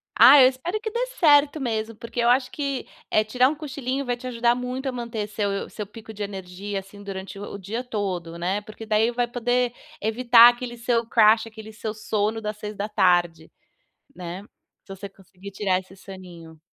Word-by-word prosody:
Ah, 285 - +9
eu 255 - +9
espero 300 +11 -3
que 440 - -3
dê 475 +3 -1
certo 295 -1 +5
mesmo, 225 -3 -2
porque 230 +2 -7
eu 235 0 +3
acho 255 +1 +3
que, 280 -3 -3 0.2
eh, 215 - +4
tirar 250 +4 +3
um 310 - -3
cochilinho 275 -2 -4
vai 245 -1 -1
te 250 - -12
ajudar 240 -1 +2
muito 250 +2 -4
a - - 0
manter 235 -4 -4
seu 200 -1 -2
seu 210 - -6
pico 220 +1 -12
de 210 0 -5
energia, 195 0 -5
assim, 200 +1 -13
durante 195 0 -7
o 200 0 -7
dia 210 +6 -5
todo, 185 -8 -4
né. 185 +4 -1
Porque 215 +1 -10
daí 220 +2 +2
vai 240 0 0
poder 245 0 0 0.3
evitar 235 +2 +7
aquele 240 0 -5
seu 235 0 0
crash, 220 -1 +5
aquele 220 -1 -11
seu 215 0 -5
sono 215 +1 -1
das 210 0 -4
18:00, 180 -6 0 0.6
né, 180 +2 -7 0.4
se 195 - -9
você 200 +1 -8
conseguir 195 0 -13
tirar 195 -2 0
esse 190 0 -16
soninho. 175 -5 -12
220 Hz, 185 wpm, -24 LUFS, 200-245 Hz, 0.6 s, Ah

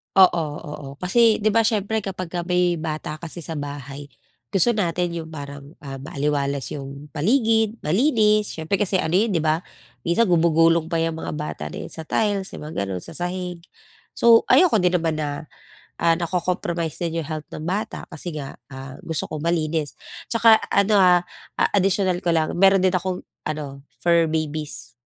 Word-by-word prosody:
Oo, 180 -3 +6 0.2
oo, 145 -3 -8
kasi 215 - +3
'di 215 - +3
ba, 230 - +3
siyempre 220 -1 +1
kapagka 185 -3 -5
may 180 -1 +2
bata 155 -1 -4
kasi 170 +1 -8
sa 165 - -5
bahay, 145 0 -7 0.4
gusto 195 +4 +4
natin 175 -5 0
'yung 165 -1 -5
parang, 140 -1 -9
ah, 135 -1 -7
maaliwalas 140 -3 -2
'yung 140 +1 -8
paligid, 220 - +2
malinis, 215 - +3
siyempre 160 +4 -1
kasi 200 -2 0
ano 165 -3 0
'yon 200 +2 +2
'di 160 - +1
ba, 155 0 +2 0.5
minsan 170 +7 +3
gumugulong 165 -2 +3
pa 170 - -3
'yang 165 -1 -2
mga - - -4
bata 150 0 -5
na - - -7
iyan - - -9
sa 160 -1 -7
tiles, 205 -3 0
'yung - - -8
mga 150 -11 -3
gano'n, 90 -2 -4
sa - - -8
sahig. 180 0 -4 0.6
So 230 -1 +5
ayoko 345 - +5
din 180 -1 +2
naman 165 -2 0
na, 150 0 -4 0.4
ah, 165 0 +2
na-co-compromise 170 -2 -2
din 165 -1 -2
'yung - - -10
health 155 -1 -5
ng 155 - -8
bata 200 +6 -3
kasi 160 +1 -6
nga, 140 -2 -7
ah, 135 -1 -9
gusto 160 -2 -2
ko 155 - -3
malinis. 160 -2 -1 0.3
At - - -22
saka 230 0 +5 0.3
ano, 200 +1 +4
ah, 180 -1 +5 0.3
ah, - - +2
additional 190 -2 +2
ko 175 -3 0
lang 160 -1 +1
meron 195 0 +5
din 185 - +4
akong 185 0 -2 0.2
ano 150 -3 -5 0.2
fur 170 -1 +4
babies, 155 -3 -3
170 Hz, 175 wpm, -23 LUFS, 155-190 Hz, 0.6 s, Oo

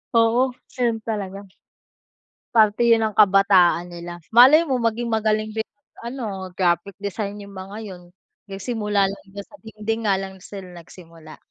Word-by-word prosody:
Oo, 230 +3 +3 0.3
ayun 235 -2 +1
talaga. 200 -3 -5 1.0
Parte 220 +1 +4
yun 230 -1 +4
ng 215 -2 -2
kabataan 190 -4 +4
nila, 175 0 -8
malay 260 +8 +8
mo 265 -4 0
maging 230 +1 -1
magaling 215 -1 0
din, 220 0 -3 0.4
ano, 215 -7 -5
graphic 175 +1 0
design 205 0 -4
yung 200 0 -12
mga 190 +2 -8
yun. 185 -3 -9 0.5
Nagsimula 205 -1 -1
lang 200 - -10
dun 200 - -7
sa 295 - -17
dingding 220 +1 -4
nga 200 - +3
lang 190 0 -8
sila 190 0 -10
nagsimula. 165 -2 -14
205 Hz, 145 wpm, -22 LUFS, 190-225 Hz, 1.0 s, malay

